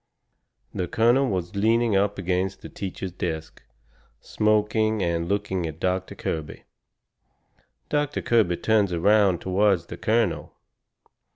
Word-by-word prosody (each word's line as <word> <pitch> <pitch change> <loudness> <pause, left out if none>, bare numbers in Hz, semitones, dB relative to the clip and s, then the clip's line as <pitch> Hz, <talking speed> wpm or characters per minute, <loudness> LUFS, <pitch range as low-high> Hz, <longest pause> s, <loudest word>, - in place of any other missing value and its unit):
The 90 - -2
colonel 120 +7 +3
was 90 -2 -3
leaning 115 +1 +2
up 100 +1 +1
agin 95 0 0
the - - -10
teacher's 95 -1 -6
desk, 80 -3 -5 0.6
smoking 110 0 +1
and 85 0 -1
looking 100 -4 -1
at 80 0 -8
Doctor 95 0 -2
Kirby. 80 -2 -5 1.2
Doctor 145 0 -1
Kirby 105 -7 +2
turns 105 -4 +2
around 95 +1 +3
toward 95 -1 +2
the - - -7
colonel. 115 +1 0
100 Hz, 115 wpm, -25 LUFS, 90-110 Hz, 1.2 s, colonel